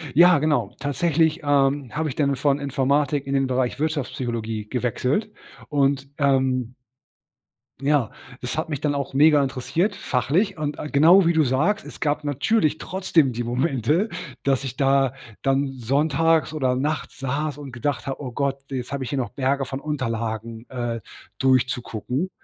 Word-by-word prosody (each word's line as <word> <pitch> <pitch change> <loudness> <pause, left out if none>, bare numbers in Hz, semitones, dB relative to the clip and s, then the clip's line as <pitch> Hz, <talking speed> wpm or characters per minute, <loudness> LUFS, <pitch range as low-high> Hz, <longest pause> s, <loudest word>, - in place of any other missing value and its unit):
Ja 175 -1 +7
genau, 140 -9 0
tatsächlich, 155 +3 +1
ähm, 140 -2 +2
habe 155 0 0
ich - - -6
dann 140 -2 +1
von 140 +1 +1
Informatik 140 +1 0
in 135 - -2
den 135 -1 +2
Bereich 130 0 -1
Wirtschaftspsychologie 120 -8 -2
gewechselt 125 - -1 0.4
und, 140 -1 +1
ähm 130 -3 +1 1.1
ja, 140 -5 +1 0.3
es 125 +4 -3
hat 160 - -2
mich 145 -4 -2
dann 145 -1 +1
auch 140 -1 -3
mega 150 0 +6
interessiert 160 - -1
fachlich 165 - 0
und, 150 -1 -3
äh, 150 - -5
genau 170 +7 +6
wie 170 - +3
du 160 -1 +4
sagst, 155 - +1
es - - -10
gab 150 0 0
natürlich 155 - +1
trotzdem 160 -7 +1
die 120 +1 -3
Momente, 135 - 0 0.3
dass 135 -1 +1
ich 130 -2 -5
da 135 -1 +3 0.3
dann 135 0 +1
sonntags 150 +6 +1
oder 130 -5 +1
nachts 145 +4 -3
saß 140 +2 -2
und 140 -3 -8
gedacht 140 +4 -2
habe: 135 +1 -4
„Oh 130 -3 -5
Gott, 140 +2 -1
jetzt 130 -2 -4
habe 140 -1 -2
ich 125 - -5
hier 140 - -2
noch 125 -3 -1
Berge 135 0 0
von 135 +2 -5
Unterlagen, 115 -5 -4
äh, 120 -3 -3 0.4
durchzugucken“ 130 - 0
140 Hz, 160 wpm, -23 LUFS, 130-150 Hz, 1.1 s, Ja